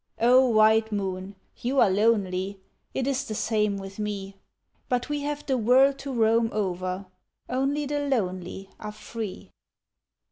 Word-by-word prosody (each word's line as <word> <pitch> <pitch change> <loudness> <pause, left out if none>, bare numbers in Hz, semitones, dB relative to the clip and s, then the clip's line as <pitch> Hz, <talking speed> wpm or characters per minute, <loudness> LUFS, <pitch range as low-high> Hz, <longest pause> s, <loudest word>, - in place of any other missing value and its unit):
O 255 +3 +6
white 220 0 +4
moon, 195 -1 -3 0.2
you 265 +3 0
are 195 - +5
lonely, 195 -2 +1 0.3
It 265 - -2
is 275 0 0
the 215 - -4
same 210 -2 +1
with 195 +1 -8
me, 200 -2 -4 0.5
But 250 +1 0
we 295 0 -1
have 295 0 -3
the 265 -3 +1
world 265 +4 +4
to 275 0 -5
roam 230 -1 +3
over, 185 -2 -2 0.4
Only 275 +3 0
the 290 +1 -1
lonely 190 -6 -2
are 210 - -6
free. 220 -2 -7
220 Hz, 145 wpm, -26 LUFS, 195-260 Hz, 0.5 s, O